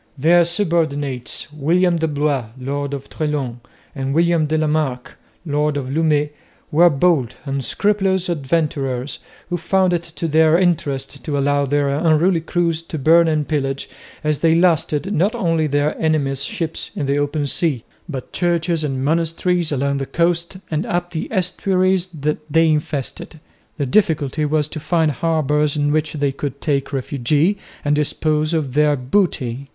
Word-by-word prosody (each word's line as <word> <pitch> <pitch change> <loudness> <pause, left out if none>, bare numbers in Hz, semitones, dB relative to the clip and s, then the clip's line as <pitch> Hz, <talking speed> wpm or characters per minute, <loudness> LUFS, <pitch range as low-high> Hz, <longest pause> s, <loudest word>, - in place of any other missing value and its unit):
Their 170 +5 +5
subordinates, 155 - -1
William 170 +4 +2
de 160 0 0
Blois, 145 -5 0
lord 140 +2 -3
of 140 - -8
Treslong, 145 -6 -3 0.3
and 135 -1 -3
William 170 -1 +3
de 155 +1 0
la 155 - +1
Marck, 150 -5 -1 0.3
lord 150 -1 0
of 130 -2 -4
Lumey, 150 -1 +1 0.4
were 170 +3 +6
bold, 140 -5 +1
unscrupulous 190 - 0
adventurers 145 -4 -1 0.3
who 175 - +1
found 185 +2 +2
it 170 - +1
to 170 0 -5
their 160 +1 +4
interest 145 -7 -1
to 145 -2 -2
allow 140 0 +1
their 145 0 +1
unruly 160 +4 +2
crews 165 -1 0
to 165 -1 -6
burn 165 +4 +5
and 155 -2 0
pillage, 135 -3 -2 0.4
as 150 -1 0
they 165 -1 +3
lusted, 170 +1 +2
not 200 +8 +1
only 165 -7 +1
their 145 +1 +1
enemies' 140 -4 0
ships 165 +1 -4
in 145 - -2
the 140 +1 +1
open 145 +1 -1
sea, 140 -4 0 0.3
but 135 -5 -6
churches 170 -2 0
and 135 -2 -2
monasteries 165 +2 0
along 140 0 0
the 135 - -3
coast 170 +1 0
and 155 +1 0
up 175 0 -2
the 160 - -3
estuaries 185 -1 +1
that 150 -4 -3
they 165 +1 +4
infested. 150 0 -2 0.4
The 145 - -1
difficulty 150 -3 +1
was 150 0 +1
to 155 - -6
find 160 0 +1
harbours 150 0 0
in 145 0 +1
which 155 -1 0
they 145 -2 0
could 140 0 -5
take 140 -3 -1
refuge 145 - +1 0.3
and 145 +1 +3
dispose 155 +1 0
of 155 -6 -1
their 150 0 +3
booty. 135 - -1
155 Hz, 155 wpm, -20 LUFS, 140-170 Hz, 0.4 s, were